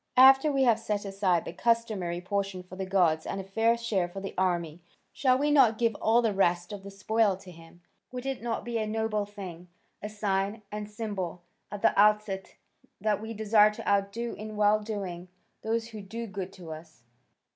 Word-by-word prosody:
After 270 Hz, +3 st, +8 dB
we 270 Hz, -1 st, +2 dB
have 230 Hz, -3 st, +4 dB
set 210 Hz, -2 st, -2 dB
aside 195 Hz, -3 st, +1 dB
the -, -, -6 dB
customary 210 Hz, -6 st, 0 dB
portion 195 Hz, 0 st, -2 dB
for 180 Hz, 0 st, -11 dB
the 190 Hz, 0 st, -4 dB
gods 175 Hz, -5 st, +2 dB
and -, -, -3 dB
a -, -, -4 dB
fair 225 Hz, +4 st, +2 dB
share 215 Hz, -6 st, 0 dB
for 195 Hz, -, -7 dB
the 195 Hz, 0 st, -6 dB
army, 175 Hz, -3 st, -1 dB, 0.3 s
shall 255 Hz, -2 st, +3 dB
we 295 Hz, +2 st, +1 dB
not 255 Hz, -7 st, +5 dB
give 230 Hz, -1 st, +2 dB
all 230 Hz, +2 st, +4 dB
the 220 Hz, -3 st, +1 dB
rest 175 Hz, -1 st, +1 dB
of 200 Hz, -, -7 dB
the 200 Hz, -, -9 dB
spoil 200 Hz, 0 st, +1 dB
to 190 Hz, -1 st, -13 dB
him? 165 Hz, +1 st, -16 dB, 0.3 s
Would 250 Hz, 0 st, -6 dB
it 270 Hz, -3 st, -3 dB
not 230 Hz, 0 st, -3 dB
be 235 Hz, -1 st, -2 dB
a 215 Hz, -, -1 dB
noble 215 Hz, -1 st, -1 dB
thing, 185 Hz, -4 st, -9 dB, 0.3 s
a 210 Hz, -, -5 dB
sign 205 Hz, 0 st, -1 dB
and 210 Hz, 0 st, -5 dB
symbol 200 Hz, -5 st, -5 dB, 0.3 s
at 205 Hz, -, -7 dB
the -, -, +5 dB
outset 210 Hz, -2 st, +2 dB, 0.4 s
that 215 Hz, -1 st, 0 dB
we 225 Hz, +1 st, -6 dB
desire 210 Hz, 0 st, +5 dB
to 210 Hz, -, -8 dB
outdo 200 Hz, +4 st, 0 dB
in 215 Hz, +1 st, -7 dB
well 210 Hz, 0 st, +4 dB
doing 195 Hz, -5 st, -5 dB, 0.3 s
those 225 Hz, +1 st, -1 dB
who 215 Hz, -2 st, -8 dB
do 225 Hz, +4 st, -6 dB
good 195 Hz, -3 st, -6 dB
to 175 Hz, -4 st, -10 dB
us?" 155 Hz, -5 st, -11 dB
205 Hz, 200 wpm, -28 LUFS, 190-225 Hz, 0.4 s, After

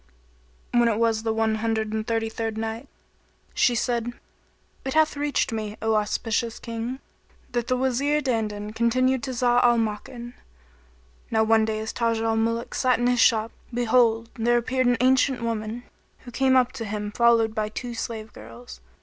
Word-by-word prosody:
When 240 Hz, -1 st, +4 dB
it 220 Hz, -2 st, +1 dB
was 225 Hz, -1 st, +1 dB
the 225 Hz, 0 st, -1 dB
One 220 Hz, 0 st, +1 dB
Hundred 220 Hz, -1 st, -1 dB
and 220 Hz, 0 st, -3 dB
Thirty 225 Hz, -1 st, 0 dB
third 225 Hz, 0 st, -4 dB
Night, 225 Hz, +4 st, -4 dB, 0.7 s
She 245 Hz, -, +3 dB
said, 240 Hz, 0 st, -1 dB, 0.7 s
It 265 Hz, +1 st, -4 dB
hath 315 Hz, -1 st, +3 dB
reached 290 Hz, -3 st, 0 dB
me, 215 Hz, -1 st, -4 dB
O 220 Hz, 0 st, 0 dB
auspicious 225 Hz, +2 st, -1 dB
King, 230 Hz, +2 st, -5 dB, 0.5 s
that 240 Hz, -1 st, -2 dB
the 255 Hz, -, +1 dB
Wazir 265 Hz, +3 st, +1 dB
Dandan 215 Hz, -6 st, -2 dB
continued 255 Hz, +3 st, +2 dB
to 265 Hz, -, -5 dB
Zau 245 Hz, -1 st, +2 dB
al 240 Hz, -1 st, +5 dB
Makan: 230 Hz, +2 st, -4 dB, 1.0 s
Now 220 Hz, -1 st, +2 dB
one 220 Hz, 0 st, +4 dB
day 220 Hz, 0 st, -2 dB
as 220 Hz, 0 st, -4 dB
Taj 230 Hz, -1 st, 0 dB
al 225 Hz, 0 st, 0 dB
Muluk 230 Hz, +1 st, -1 dB
sat 255 Hz, -1 st, +2 dB
in 240 Hz, -, -1 dB
his 245 Hz, 0 st, +2 dB
shop, 225 Hz, 0 st, +3 dB, 0.2 s
behold, 235 Hz, -1 st, +2 dB
there 240 Hz, +1 st, +3 dB
appeared 255 Hz, +2 st, 0 dB
an 245 Hz, 0 st, +3 dB
ancient 260 Hz, -1 st, +3 dB
woman, 225 Hz, +1 st, -3 dB, 0.4 s
who 245 Hz, -, -11 dB
came 260 Hz, +1 st, +2 dB
up 250 Hz, -1 st, +4 dB
to 250 Hz, -4 st, -6 dB
him 210 Hz, 0 st, -4 dB
followed 230 Hz, -1 st, +3 dB
by 215 Hz, -1 st, -2 dB
two 240 Hz, +2 st, -6 dB
slave 225 Hz, -1 st, -5 dB
girls. 115 Hz, -, -12 dB
230 Hz, 175 wpm, -25 LUFS, 220-245 Hz, 1.0 s, al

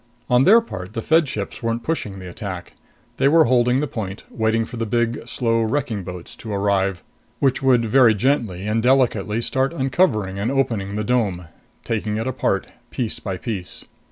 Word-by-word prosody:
On 125 Hz, +2 st, +5 dB
their 225 Hz, +4 st, +7 dB
part, 95 Hz, -, -8 dB
the 115 Hz, -, -3 dB
Fed 160 Hz, -1 st, +3 dB
ships 105 Hz, -6 st, -5 dB
weren't 115 Hz, 0 st, -2 dB
pushing 115 Hz, -11 st, -3 dB
the 95 Hz, -1 st, -8 dB
attack. 90 Hz, 0 st, -7 dB, 0.4 s
They 135 Hz, -, +3 dB
were 160 Hz, +3 st, +6 dB
holding 125 Hz, +1 st, +3 dB
the 150 Hz, -, -1 dB
point, 105 Hz, -5 st, -5 dB
waiting 110 Hz, 0 st, +1 dB
for 120 Hz, -, -9 dB
the 115 Hz, -1 st, -2 dB
big, 120 Hz, +1 st, -1 dB
slow 115 Hz, -2 st, 0 dB
wrecking 110 Hz, -2 st, -1 dB
boats 90 Hz, -1 st, -8 dB
to 110 Hz, -, -7 dB
arrive, 100 Hz, -2 st, 0 dB, 0.3 s
which 135 Hz, -2 st, +1 dB
would 125 Hz, -3 st, +4 dB
very 115 Hz, -1 st, +5 dB
gently 105 Hz, -6 st, 0 dB
and 110 Hz, +2 st, +1 dB
delicately 115 Hz, -4 st, +2 dB
start 130 Hz, +4 st, 0 dB
uncovering 130 Hz, -, +1 dB
and 105 Hz, +4 st, 0 dB
opening 115 Hz, -7 st, -1 dB
the 105 Hz, -, -1 dB
dome, 100 Hz, -8 st, 0 dB, 0.3 s
taking 105 Hz, -1 st, -2 dB
it 110 Hz, -, -2 dB
apart, 130 Hz, -, 0 dB, 0.2 s
piece 120 Hz, -4 st, -3 dB
by 95 Hz, -3 st, -4 dB
piece. 95 Hz, -4 st, -4 dB
115 Hz, 180 wpm, -22 LUFS, 100-130 Hz, 0.4 s, their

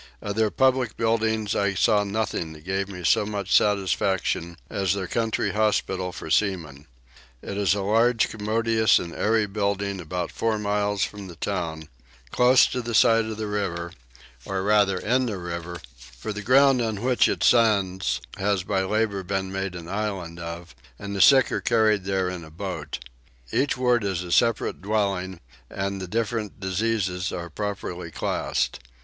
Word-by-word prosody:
Of 100 Hz, -1 st, -4 dB
their 110 Hz, -1 st, +2 dB
public 130 Hz, -1 st, +1 dB
buildings 110 Hz, -2 st, 0 dB
I 100 Hz, -1 st, +1 dB
saw 105 Hz, +2 st, +3 dB
nothing 100 Hz, -6 st, -2 dB
that 75 Hz, -1 st, -14 dB
gave 95 Hz, +1 st, -1 dB
me 90 Hz, -2 st, -8 dB
so 85 Hz, -, +4 dB
much 100 Hz, -2 st, -1 dB
satisfaction 95 Hz, -4 st, +1 dB
as 100 Hz, -2 st, 0 dB
their 95 Hz, -2 st, -3 dB
country 115 Hz, +4 st, -1 dB
hospital 95 Hz, -4 st, 0 dB
for -, -, -8 dB
seamen. 80 Hz, -9 st, 0 dB, 0.6 s
It 100 Hz, -, -5 dB
is 100 Hz, -1 st, +2 dB
a 100 Hz, -, -2 dB
large 115 Hz, +3 st, +3 dB
commodious 110 Hz, 0 st, +2 dB
and 85 Hz, -1 st, -4 dB
airy 110 Hz, 0 st, +1 dB
building 100 Hz, -1 st, -2 dB
about 90 Hz, +1 st, -4 dB
four 115 Hz, -1 st, 0 dB
miles 105 Hz, -1 st, 0 dB
from 100 Hz, -2 st, -5 dB
the 85 Hz, -, -10 dB
town, 80 Hz, -5 st, -3 dB, 0.4 s
close 125 Hz, +1 st, +6 dB
to 125 Hz, -, -2 dB
the 115 Hz, -1 st, -3 dB
side 115 Hz, 0 st, +5 dB
of 110 Hz, -1 st, -5 dB
the 110 Hz, -, -3 dB
river, 90 Hz, -5 st, -3 dB, 0.5 s
or 95 Hz, +4 st, -3 dB
rather 100 Hz, -2 st, +3 dB
in 125 Hz, +6 st, +1 dB
the 105 Hz, -4 st, -3 dB
river: 85 Hz, -1 st, -6 dB, 0.4 s
for 105 Hz, -, -5 dB
the 105 Hz, -, -5 dB
ground 130 Hz, +3 st, +5 dB
on 110 Hz, -2 st, -2 dB
which 125 Hz, -1 st, +3 dB
it -, -, -1 dB
stands 95 Hz, -, +3 dB, 0.2 s
has 100 Hz, -2 st, 0 dB
by 95 Hz, 0 st, 0 dB
labour 100 Hz, 0 st, 0 dB
been 95 Hz, 0 st, -3 dB
made 95 Hz, -1 st, -3 dB
an 85 Hz, -1 st, -8 dB
island 95 Hz, -4 st, -4 dB
of, 85 Hz, -1 st, -7 dB, 0.2 s
and 100 Hz, 0 st, -6 dB
the 100 Hz, -, +1 dB
sick 135 Hz, +5 st, +6 dB
are -, -, -1 dB
carried 110 Hz, -4 st, +2 dB
there 95 Hz, -1 st, 0 dB
in 90 Hz, -2 st, -5 dB
a 80 Hz, -, -11 dB
boat: 80 Hz, -3 st, -5 dB, 0.5 s
each 140 Hz, 0 st, +1 dB
ward 125 Hz, -2 st, +2 dB
is 95 Hz, -3 st, -1 dB
a 90 Hz, -, -7 dB
separate 115 Hz, -3 st, +2 dB
dwelling 95 Hz, -3 st, -1 dB, 0.3 s
and 100 Hz, 0 st, -3 dB
the 95 Hz, -, -5 dB
different 110 Hz, 0 st, -2 dB
diseases 95 Hz, -1 st, -1 dB
are 85 Hz, -2 st, -6 dB
properly 95 Hz, -3 st, -4 dB
classed. -, -, -2 dB
100 Hz, 170 wpm, -25 LUFS, 90-110 Hz, 0.6 s, close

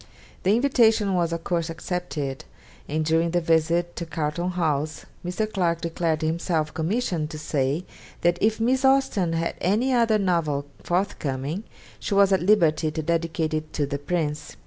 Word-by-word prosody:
The 195 Hz, +3 st, +3 dB
invitation 225 Hz, -6 st, +3 dB
was 170 Hz, -2 st, +1 dB
of 165 Hz, 0 st, -3 dB
course 170 Hz, -1 st, -1 dB
accepted, 165 Hz, -5 st, -4 dB, 0.5 s
and 155 Hz, +1 st, 0 dB
during 165 Hz, +1 st, +2 dB
the 175 Hz, +1 st, +1 dB
visit 165 Hz, +1 st, +1 dB
to 170 Hz, -, -3 dB
Carlton 160 Hz, +2 st, -2 dB
House 155 Hz, -4 st, -1 dB, 0.2 s
Mr. 180 Hz, +5 st, -1 dB
Clarke 175 Hz, -5 st, 0 dB
declared 165 Hz, -2 st, -1 dB
himself 160 Hz, -1 st, -1 dB
commissioned 165 Hz, -2 st, -1 dB
to 155 Hz, -, -7 dB
say 145 Hz, +2 st, -1 dB, 0.4 s
that 175 Hz, 0 st, +2 dB
if 220 Hz, +1 st, +2 dB
Miss 255 Hz, +4 st, +2 dB
Austen 265 Hz, -10 st, +3 dB
had 165 Hz, 0 st, -1 dB
any 225 Hz, +8 st, +2 dB
other 230 Hz, -3 st, +3 dB
novel 165 Hz, -7 st, 0 dB, 0.2 s
forthcoming 175 Hz, -, -2 dB, 0.3 s
she 200 Hz, -, -2 dB
was 200 Hz, 0 st, +5 dB
at 190 Hz, -, +2 dB
liberty 170 Hz, -5 st, +3 dB
to 155 Hz, +1 st, -4 dB
dedicate 165 Hz, -1 st, -1 dB
it 155 Hz, 0 st, -3 dB
to 145 Hz, -, 0 dB
the 140 Hz, 0 st, -3 dB
Prince. 150 Hz, -1 st, -2 dB
170 Hz, 160 wpm, -25 LUFS, 155-190 Hz, 0.5 s, was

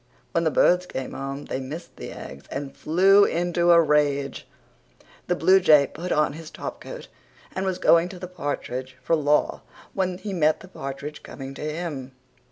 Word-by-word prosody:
When 170 Hz, 0 st, +1 dB
the -, -, +4 dB
birds 180 Hz, +3 st, +3 dB
came 130 Hz, -5 st, -5 dB
home 135 Hz, +1 st, -5 dB
they -, -, -3 dB
missed 155 Hz, +6 st, -8 dB
the -, -, -7 dB
eggs 70 Hz, +1 st, -9 dB
and 140 Hz, 0 st, -5 dB
flew 195 Hz, +5 st, +5 dB
into 175 Hz, -1 st, +1 dB
a 170 Hz, -1 st, +8 dB
rage. 145 Hz, -3 st, +1 dB, 0.8 s
The 180 Hz, -, +1 dB
bluejay 175 Hz, -7 st, +5 dB
put 175 Hz, +3 st, -5 dB
on 150 Hz, -2 st, +2 dB
his 160 Hz, 0 st, -9 dB
topcoat -, -, -8 dB, 0.5 s
and 190 Hz, 0 st, -2 dB
was 185 Hz, -1 st, -1 dB
going 170 Hz, +1 st, +4 dB
to 185 Hz, -, -9 dB
the 180 Hz, -, -7 dB
partridge 130 Hz, -6 st, -5 dB
for 165 Hz, -, +2 dB
law 150 Hz, -1 st, +1 dB, 0.3 s
when 185 Hz, -2 st, -1 dB
he 200 Hz, +1 st, -6 dB
met 155 Hz, -3 st, +2 dB
the 190 Hz, -, -11 dB
partridge 140 Hz, -3 st, -7 dB
coming 135 Hz, 0 st, -8 dB
to -, -, -10 dB
him. 150 Hz, -4 st, -4 dB
155 Hz, 175 wpm, -25 LUFS, 140-180 Hz, 0.8 s, a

